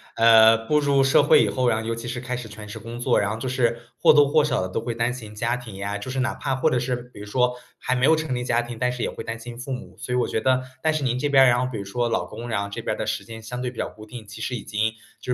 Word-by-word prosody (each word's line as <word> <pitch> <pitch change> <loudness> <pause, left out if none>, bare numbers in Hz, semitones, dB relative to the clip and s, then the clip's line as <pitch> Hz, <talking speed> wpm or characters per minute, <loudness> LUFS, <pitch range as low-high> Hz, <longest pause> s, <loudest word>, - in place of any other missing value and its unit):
呃， 115 0 +6
步 150 +5 +3
入 140 -1 +3
社 135 +1 +5
会 145 - +5
以 - - +1
后 125 -1 +1
呀， 110 -1 +1
尤 115 +1 -2
其 115 +1 -6
是 125 0 -4
开 125 -1 -3
始 125 - -7
全 105 0 -10
职 110 +2 -8
工 115 +2 -8
作， 120 +1 +2
然 100 0 0
后 - - -2
就 125 +3 -4
是 120 -2 0 0.2
或 - - +7
多 145 -1 +6
或 145 +1 +3
少 150 - 0
地 - - -5
都 - - -2
会 120 - -4
担 115 +1 0
心 110 -4 -9
家 115 +3 -1
庭 120 -5 -10
呀， 100 +1 -3
就 100 +5 -7
是 130 0 -1
哪 130 - -1
怕 135 - -2
或 130 - +1
者 125 - +2
是 125 0 -1 0.2
比 - - -12
如 105 - -7
说 125 +4 +1 0.2
还 130 - -1
没 125 +1 +2
有 160 - +6
成 155 -4 -2
立 125 0 -2
家 120 -1 +2
庭， 120 -1 -7
但 125 - +2
是 125 - -4
也 - - 0
会 - - -8
担 115 0 -4
心 120 +1 -9
父 130 +2 -5
母。 125 - -8
所 125 - -3
以 - - +2
我 125 - +2
觉 - - -1
得 130 +3 +2 0.2
但 160 0 +2
是 155 - -1
您 125 -1 0
这 145 - 0
边 135 -2 +6
儿， 130 - +6
然 120 - +3
后 125 - 0
比 120 - -5
如 100 - -4
说 120 +5 -1
老 115 - 0
公， 115 +3 -8
然 110 -4 -1
后 100 - -6
这 - - -5
边 - - -2
的 - - -3
时 - - -3
间 110 -1 -10
相 125 +2 -5
对 125 - -2
比 125 - -14
较 - - -2
固 110 0 -13
定， 115 0 -10
其 105 +2 -11
实 125 - -2
已 110 - -6
经 110 +1 -1 0.3
就 125 - -2
120 Hz, 370 characters per minute, -24 LUFS, 110-130 Hz, 0.3 s, 或